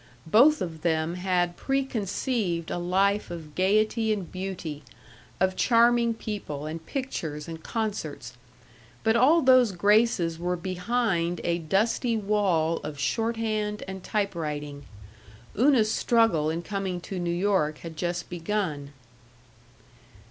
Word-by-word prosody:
Both 235 - +5
of 160 -3 -7
them 160 0 0
had 180 -1 0
preconceived 220 -8 -1
a - - -2
life 195 +4 +1
of 160 -3 -8
gaiety 215 +4 +2
and 200 -5 -3
beauty, 185 -5 -5 0.6
of 185 0 +2
charming 235 0 +3
people 200 -10 -5
and 160 +1 -6
pictures 160 - -4
and 165 -1 -7
concerts. 210 -10 -4 0.7
But 220 0 +3
all 295 +8 +5
those 255 -4 +6
graces 200 -3 +2
were 180 +1 -1
behind 180 -1 -1
a 170 0 0
dusty 220 - +1
wall 195 -6 +1
of 150 -1 -7
shorthand 220 +1 -1
and 190 -1 -7
typewriting. 150 -8 -3 0.7
Una's 235 -2 +4
struggle 225 -13 +2
in 165 +2 -3
coming 195 -1 -3
to 185 +1 -5
New 175 -1 -2
York 175 -4 +1
had 165 -1 -7
just 175 +1 -3
begun. 165 -5 -3
190 Hz, 120 wpm, -26 LUFS, 165-220 Hz, 0.7 s, those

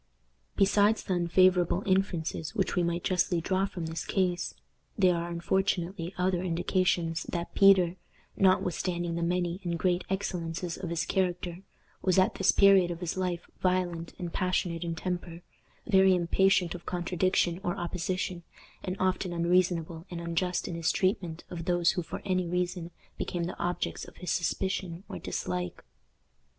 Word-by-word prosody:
Besides 205 +2 +3
the 190 - -1
unfavorable 180 +1 +3
inferences 185 -5 0
which - - 0
we 180 - +2
might 170 0 -1
justly 180 -1 +1
draw 190 +3 0
from 180 -4 -6
this 160 +1 -4
case, 180 -2 -1 0.4
there 185 -4 +4
are 170 0 -3
unfortunately 175 0 -1
other 180 -1 +1
indications 175 -1 0
that 170 -1 -3
Peter, 190 -3 +5 0.4
notwithstanding 180 -2 +1
the 170 - -2
many 175 +1 -1
and 170 -1 -1
great 180 +1 +1
excellences 175 -3 -3
of 180 - -5
his 170 -1 -1
character, 180 -1 -1 0.4
was 185 -1 +2
at 185 - +4
this 195 - +3
period 195 -3 +6
of 170 -1 -4
his 175 -2 -3
life 180 -2 -2
violent 180 -2 -1
and 175 -2 -5
passionate 180 -2 0
in 165 -1 -3
temper, 175 0 -4 0.4
very 190 -3 +5
impatient 180 0 +2
of 175 - -10
contradiction 180 0 0
or 175 -3 -1
opposition, 180 +1 -2 0.4
and 185 - -3
often 185 -1 0
unreasonable 170 -1 +1
and 175 - -5
unjust 170 +1 -1
in - - -4
his 165 -1 +1
treatment 185 -4 -1
of 170 -2 -5
those 175 -1 +3
who 180 - -2
for 165 - -7
any 185 -2 0
reason 180 0 -2 0.3
became 175 -1 -2
the 175 - -5
objects 175 +1 -2
of - - -15
his 180 - -3
suspicion 185 0 -1
or - - -6
dislike. 90 -1 -4
175 Hz, 155 wpm, -29 LUFS, 170-185 Hz, 0.4 s, period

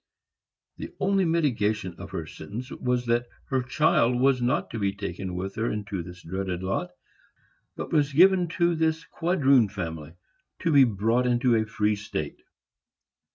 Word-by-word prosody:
The - - -7
only 195 -1 +2
mitigation 110 - 0
of - - -8
her - - -5
sentence 125 +6 -8
was 125 -1 -1
that 120 +1 +1 0.2
her 130 -1 +1
child 125 -2 +2
was 130 -1 +3
not 120 +1 0
to 115 - -4
be 100 -1 0
taken 95 -2 -5
with 95 +2 -4
her 115 +2 -1
into 100 -3 -4
this 90 +1 -11
dreaded 95 +1 -4
lot, 95 +1 -2 0.9
but - - -6
was 145 -2 +2
given 180 +4 +5
to 175 -1 +3
this 160 0 0
quadroon 140 - +2
family 80 -5 -6 0.5
to 165 - +2
be 140 -3 +7
brought 115 +3 +1
into 120 0 +3
a 110 -1 +1
free 105 0 0
state. 100 -7 -5
120 Hz, 155 wpm, -26 LUFS, 100-140 Hz, 0.9 s, be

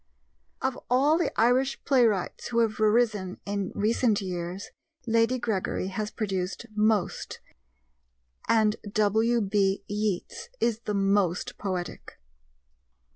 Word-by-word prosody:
Of 265 -1 -1
all 285 +6 +4
the 345 - 0
Irish 255 +4 +2
playwrights 230 -9 +2
who 235 - -3
have 220 -2 0
arisen 215 -4 +2
in 200 -2 -2
recent 220 +1 +2
years, 180 0 -5 0.3
Lady 230 +2 +2
Gregory 205 -5 -2
has 210 +2 -3
produced 195 -2 -3
most 215 -2 0 1.1
and 220 -1 +3
W.B. 210 -2 +2
Yeats 205 -3 -3
is 230 -2 +1
the 210 - -1
most 195 -3 +1
poetic. 185 -4 -5
210 Hz, 105 wpm, -27 LUFS, 195-230 Hz, 1.1 s, all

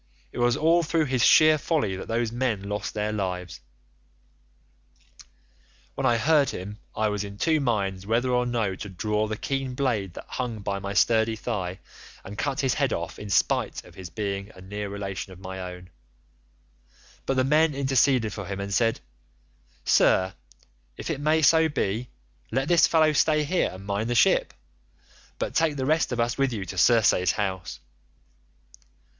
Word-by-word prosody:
It - - -7
was 120 0 +2
all 165 +2 +4
through 165 -1 +1
his 130 -4 0
sheer 155 +1 +6
folly 145 - 0
that 95 - -7
those 115 0 -1
men 120 -5 -1
lost 105 +1 -4
their 105 0 -1
lives.' 90 -4 -4 2.3
"When 135 - 0
I 120 -2 +3
heard 145 +3 +3
him 105 +4 -7 0.2
I 110 - +1
was 105 -1 -2
in 100 0 -8
two 160 +6 +2
minds 100 -7 -1
whether 120 +3 +1
or 125 0 +1
no 115 -5 -1
to 100 +2 -7
draw 105 +3 -1
the 110 0 -4
keen 135 0 -3
blade 110 -9 -1
that - - -8
hung 120 -4 -4
by 100 0 -3
my 100 +1 -5
sturdy 110 +1 +3
thigh 95 -6 -4 0.5
and 100 - -8
cut 135 +6 -1
his 135 -2 +1
head 140 -3 0
off 85 +1 -5
in 105 - -7
spite - - +1
of - - -16
his 95 -2 -9
being 100 +1 -4
a 95 - -13
near 100 +2 -5
relation 100 -1 -5
of 90 - -14
my 95 0 -7
own; 90 0 -9 1.4
but 135 - +1
the 130 - +3
men 150 +2 +3
interceded 130 -5 +2
for 100 -3 -6
him 100 -1 -5
and 100 0 -4
said, 115 +1 +1 0.8
'Sir, 95 +1 +3 0.6
if - - -4
it 145 -3 -4
may 155 +1 +2
so 160 +2 +5
be, 115 -3 -2 0.4
let 135 +4 -1
this 170 0 +5
fellow 155 -2 +3
stay 155 0 +3
here 175 +5 +1
and 95 +1 -10
mind 100 +3 -2
the 120 - 0
ship, - - +3 0.8
but - - -3
take 160 -2 +2
the 130 -2 -2
rest 155 +1 +1
of 120 - -2
us 120 +3 0
with 135 -1 +2
you 105 -5 -4
to 90 - -7
Circe's 95 -4 +4
house. 95 -3 -3
115 Hz, 175 wpm, -26 LUFS, 100-135 Hz, 2.3 s, sheer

